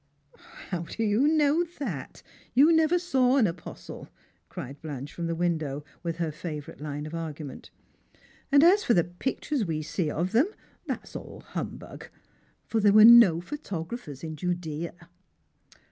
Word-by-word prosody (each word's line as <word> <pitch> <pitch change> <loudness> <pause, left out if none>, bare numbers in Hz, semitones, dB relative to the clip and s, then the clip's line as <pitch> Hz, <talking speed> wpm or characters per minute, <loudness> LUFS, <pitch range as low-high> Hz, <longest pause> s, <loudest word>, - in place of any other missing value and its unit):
" - - -23 0.3
How 180 - -2
do 170 +7 -4
you 220 +6 +3
know 310 +1 +3
that? 180 - -6 0.3
You 290 +6 +7
never 320 +2 +4
saw 270 -7 +2
an 245 - +5
apostle," 170 -2 -7 0.4
cried 140 +3 -8
Blanche 145 -2 -6
from 170 -1 -4
the 165 - -2
window, 160 -4 -1 0.2
with 170 -1 -3
her 165 -2 -2
favourite 150 -3 -7
line 150 0 -5
of 155 - -8
argument. 155 -4 -6 0.4
" - - -30
And 285 +1 +6
as 385 +5 +6
for 235 - +3
the 175 - +4
pictures 250 - -3
we 160 -4 -2
see 160 +1 -2
of 170 +5 -2
them, 245 - +4 0.4
that's - - -5
all - - -8
humbug! - - -7 0.6
for 225 - 0
there 205 -1 +4
were 215 0 +9
no 230 -8 +8
pliotographcrs 175 - -6
in 160 -1 -5
Judea." 170 0 -4
175 Hz, 160 wpm, -27 LUFS, 155-245 Hz, 0.6 s, were